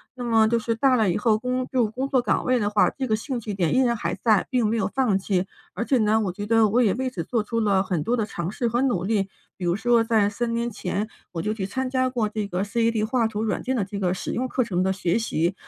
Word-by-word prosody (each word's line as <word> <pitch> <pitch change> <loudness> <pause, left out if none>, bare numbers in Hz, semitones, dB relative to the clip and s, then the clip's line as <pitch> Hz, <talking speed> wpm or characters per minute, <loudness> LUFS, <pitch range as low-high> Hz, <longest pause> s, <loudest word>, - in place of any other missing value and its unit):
那 250 - -6
么 225 -2 +4
就 235 +1 +2
是 230 0 -1
大 255 +3 +3
了 215 -6 +2
以 - - 0
后 215 0 +2
工 250 +2 -2
就 245 -3 +3
工 265 +3 -2
作 260 -2 +2
岗 - - 0
位 255 0 +3
的 205 -3 0
话， 210 -1 +3
这 265 - -4
个 215 -3 +1
兴 255 +2 -4
趣 210 -1 -5
点 180 0 0
依 - - +4
然 235 -2 +2
还 - - -2
在， 215 -4 +2
并 250 -3 +1
没 225 +2 +1
有 195 -3 0
放 230 -8 +2
弃。 190 -1 0 0.3
而 205 - -2
且 260 +2 +2
呢， 220 -1 +2
我 190 -4 -1
觉 205 +3 -6
得 225 -1 +4
我 240 +4 +3
也 205 -5 +3
为 260 +1 -2
此 185 -9 -5
做 230 +1 0
出 230 +2 -2
了 200 -3 +2
很 180 -5 -1
多 235 +9 0
的 225 -3 0
尝 175 -4 -4
试 235 +2 -1
和 240 +3 0
努 235 -10 +1
力， 200 -1 0 0.3
比 180 - -4
如 175 0 +2
说 235 +2 +3
在 220 -3 +3
3 230 +3 -2
年 235 +1 -1
前， 205 +2 -3 0.2
我 165 - -3
就 210 +4 -1
去 200 -3 -3
参 260 +6 -3
加 255 0 +1
过 235 -4 -1
这 210 -1 -3
个 185 0 -2
CAD 225 +1 0
画 230 -1 +1
图 215 -1 -3
软 215 -3 -1
件 260 +1 -1
的 225 - +1
这 200 +1 -6
个 180 -2 +1
使 - - -4
用 255 +2 -1
课 255 0 0
程 185 -5 -1
的 190 0 +1
学 185 +2 0
习。 175 -5 0
220 Hz, 315 characters per minute, -24 LUFS, 200-240 Hz, 0.3 s, 么